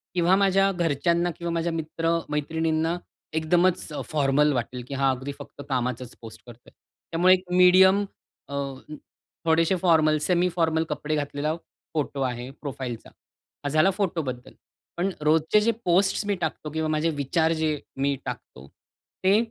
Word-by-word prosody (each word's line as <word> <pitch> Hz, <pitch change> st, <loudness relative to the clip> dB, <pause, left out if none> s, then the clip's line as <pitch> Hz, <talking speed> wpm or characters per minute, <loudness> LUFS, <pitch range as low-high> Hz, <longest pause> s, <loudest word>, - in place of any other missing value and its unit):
किंवा 180 Hz, +1 st, +4 dB
माझ्या 195 Hz, 0 st, +3 dB
घरच्यांना 170 Hz, 0 st, +1 dB
किंवा 170 Hz, 0 st, -3 dB
माझ्या 170 Hz, 0 st, -1 dB
मित्र-मैत्रिणींना 160 Hz, 0 st, -1 dB, 0.4 s
एकदमच 175 Hz, +3 st, +2 dB, 0.2 s
फॉर्मल 150 Hz, 0 st, +3 dB
वाटेल 125 Hz, 0 st, -3 dB
की 140 Hz, -, -7 dB
हा 135 Hz, 0 st, +2 dB
अगदी 130 Hz, +2 st, -4 dB
फक्त 145 Hz, -, -10 dB
कामाचाच 125 Hz, -1 st, -2 dB
पोस्ट 115 Hz, -2 st, -11 dB
करतोय. 120 Hz, 0 st, -14 dB, 0.4 s
त्यामुळे 180 Hz, +3 st, +5 dB
एक 185 Hz, 0 st, +1 dB
मीडियम 190 Hz, +2 st, +6 dB, 0.4 s
अ, 140 Hz, -, -5 dB, 0.9 s
थोडेसे 165 Hz, +3 st, +3 dB
फॉर्मल, 155 Hz, -3 st, +4 dB
सेमी 180 Hz, +2 st, +2 dB
फॉर्मल 160 Hz, -1 st, +2 dB
कपडे 150 Hz, 0 st, -2 dB
घातलेला 145 Hz, +1 st, -2 dB, 0.4 s
फोटो 145 Hz, -2 st, -2 dB
आहे 125 Hz, -1 st, -2 dB
प्रोफाइलचा. 130 Hz, -5 st, -6 dB, 0.5 s
हा 145 Hz, -, -1 dB
झाला 155 Hz, +6 st, +4 dB
फोटोबद्दल. 165 Hz, -11 st, -3 dB, 0.4 s
पण 185 Hz, +3 st, +1 dB
रोजचे 155 Hz, +6 st, +3 dB
जे 230 Hz, -, +3 dB
पोस्ट्स 190 Hz, +4 st, +2 dB
मी 205 Hz, -1 st, 0 dB
टाकतो 155 Hz, -1 st, -3 dB
किंवा 160 Hz, 0 st, -1 dB
माझे 155 Hz, +1 st, +1 dB
विचार 160 Hz, +4 st, +1 dB
जे 155 Hz, -2 st, 0 dB, 0.2 s
मी 140 Hz, +1 st, +1 dB
टाकतो 65 Hz, +2 st, -8 dB, 0.6 s
ते 195 Hz, +3 st, +5 dB
160 Hz, 140 wpm, -25 LUFS, 140-175 Hz, 0.9 s, मीडियम